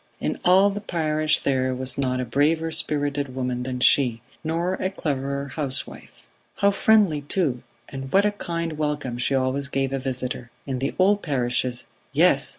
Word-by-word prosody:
"In - - -2
all 190 +3 +5
the 205 +1 -5
parish 155 -5 0
there 130 -1 0
was 130 0 -3
not 130 -2 0
a 130 - -1
braver 155 +7 +1
spirited 145 -3 -1
woman 125 -1 -2
than 125 0 -4
she, 125 -4 +4 0.2
nor 165 +3 -1
a 185 0 -1
cleverer 140 -5 -3
housewife. 140 -2 -2 0.3
How 200 0 +4
friendly 200 -7 +3
too, 145 -4 -1 0.3
and 135 -1 -7
what 200 +5 +4
a 210 - +3
kind 170 -5 -4
welcome 145 -5 -2
she 135 +2 +1
always 135 +1 0
gave 135 -1 -1
a 135 - -1
visitor! 125 -1 -3 0.2
In 130 -2 -3
the 135 +2 -2
old 200 +2 +3
parishes 125 -3 -1 0.3
yes! - - +4
140 Hz, 165 wpm, -24 LUFS, 130-165 Hz, 0.3 s, all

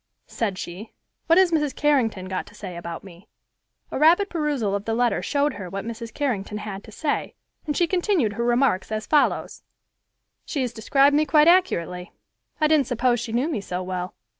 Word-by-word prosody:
said 205 -5 -3
she, 185 +6 -8 0.3
"what 330 0 +5
has 375 -2 +5
Mrs. 300 -4 0
Carrington 245 -10 +1
got 185 0 -4
to - - -15
say 190 -4 -7
about 170 -1 -7
me." 190 +1 -14 0.6
A - - -3
rapid 345 +7 +4
perusal 290 - -1
of 200 +1 -2
the 225 - -1
letter 230 -6 +1
showed 285 +9 0
her 195 -4 -7
what 195 +3 -5
Mrs. 230 0 -6
Carrington 215 -7 -2
had 205 -1 -6
to 220 - -12
say, 290 +7 -2 0.3
and 295 - -1
she 350 - +4
continued 345 - +1
her 235 - -2
remarks 240 -5 +1
as 215 0 -2
follows: 300 -2 +1 0.8
"She 285 - -3
has 245 -2 -2
described 275 +5 +3
me 305 +1 +2
quite 300 +2 +5
accurately. 180 - +2 0.5
I 310 - +3
didn't 305 -4 +3
suppose 245 -1 +1
she 230 0 -5
knew 245 +6 +1
me 280 -11 -2
so 185 -1 -4
well. 185 0 -4
235 Hz, 190 wpm, -24 LUFS, 195-295 Hz, 0.8 s, what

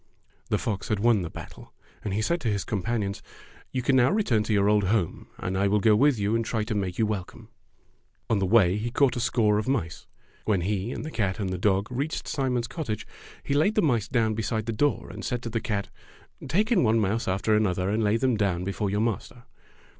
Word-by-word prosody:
The - - +2
fox 100 -4 -3
had 110 -3 0
won 115 -1 +3
the 85 - -4
battle, - - -11 0.3
and 105 - -3
he 105 +3 0
said 170 +7 0
to 120 - -2
his 100 -2 -1
companions, 105 -1 -2 0.5
''You 130 -1 -2
can 135 +2 +3
now 125 -1 +5
return 185 - +2
to 110 - -2
your 100 -1 +3
old 105 -1 +3
home 95 -4 -1
and 95 - -3
I 100 +1 +2
will 105 +1 +2
go 110 +1 +4
with 140 +3 +4
you 105 +2 0
and 115 - +1
try 110 -1 -1
to 110 +1 -3
make 95 -4 -2
you 110 - +2
welcome." 105 -4 -5 0.8
On 110 - +1
the 95 - 0
way 100 -4 +5
he 115 +3 -2
caught 125 +1 +2
a - - -2
score 105 -3 +2
of 110 - -4
mice. 110 -12 -2 0.4
When 100 -5 +1
he 100 +4 -1
and - - -5
the 155 - -5
cat 100 -6 -1
and 95 -3 -2
the 95 - -2
dog 100 0 +2
reached 140 +5 -3
Simon's 125 -4 -1
cottage 115 - -4 0.4
he 140 - -2
laid 155 +9 +2
the 210 - +3
mice 120 -8 +1
down 115 -3 +1
be 110 - -2
side 110 -1 -2
the 115 - -2
door 145 +7 0
and - - -8
said 125 -1 -2
to 115 - -5
the 115 0 -1
cat, 100 -2 -2 0.6
"Take 210 - +1
in 215 - +4
one 115 -1 +3
mouse 105 +2 0
after 100 +3 +1
another 95 -3 +1
and 110 +1 +1
lay 105 +2 +2
them 130 0 +1
down 95 -4 0
before 100 +2 -2
your 105 +2 0
master." 120 +2 -3
110 Hz, 235 wpm, -26 LUFS, 100-120 Hz, 0.8 s, now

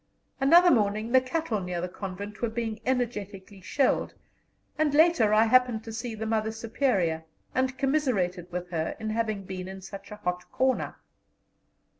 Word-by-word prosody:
Another 345 +6 +7
morning 215 0 +1
the 260 0 +6
cattle 255 -4 -2
near 180 -2 -3
the 180 - -2
convent 195 +2 -7
were 235 - +1
being 225 -1 -3
energetically 205 -6 -3
shelled, 275 +6 +1 0.6
and 300 -1 +1
later 310 -9 +5
I 215 +1 +6
happened 245 -1 +3
to 225 - -8
see 230 0 -4
the 220 +1 -4
Mother 220 0 0
Superior, 220 - 0 0.3
and 260 0 0
commiserated 215 - 0
with 180 0 -5
her 160 -2 -2
in 220 -1 -3
having 215 -3 -1
been 185 -1 -6
in 190 0 -7
such 195 +1 -10
a 210 - -7
hot 180 -3 -4
corner. 260 0 0
220 Hz, 160 wpm, -27 LUFS, 190-255 Hz, 0.6 s, Another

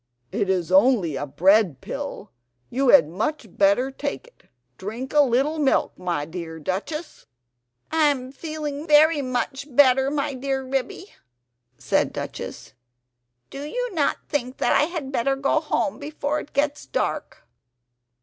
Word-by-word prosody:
"It 200 - -1
is 180 -2 0
only 190 - +4
a 145 +2 -3
bread 185 - +3
pill, 285 -7 -6 0.4
you 265 +1 +1
had 275 - +7
much 220 - -3
better 200 +7 +3
take 285 - -4
it; - - -23 0.4
drink 225 +7 -6
a 295 - +6
little 280 +4 +1
milk, 280 -3 +2
my 175 -5 -2
dear 165 0 -7
Duchess!" 215 - -5 0.6
"I 320 -2 +4
am 260 -3 -1
feeling 300 0 -5
very 305 0 +5
much 270 +2 -3
better, 265 0 +5
my 285 0 -1
dear 265 0 -2
Ribby," 270 - -3 0.6
said - - 0
Duchess. - - -7 0.8
"Do 275 - -7
you - - -3
not 300 -5 +1
think 255 -3 -2
that - - +2
I - - +4
had 315 -5 -5
better 270 +1 +1
go 275 +3 +1
home 300 -2 -1
before 295 0 -2
it 295 - -11
gets 290 +1 -1
dark?" - - -3
270 Hz, 145 wpm, -24 LUFS, 220-295 Hz, 0.8 s, had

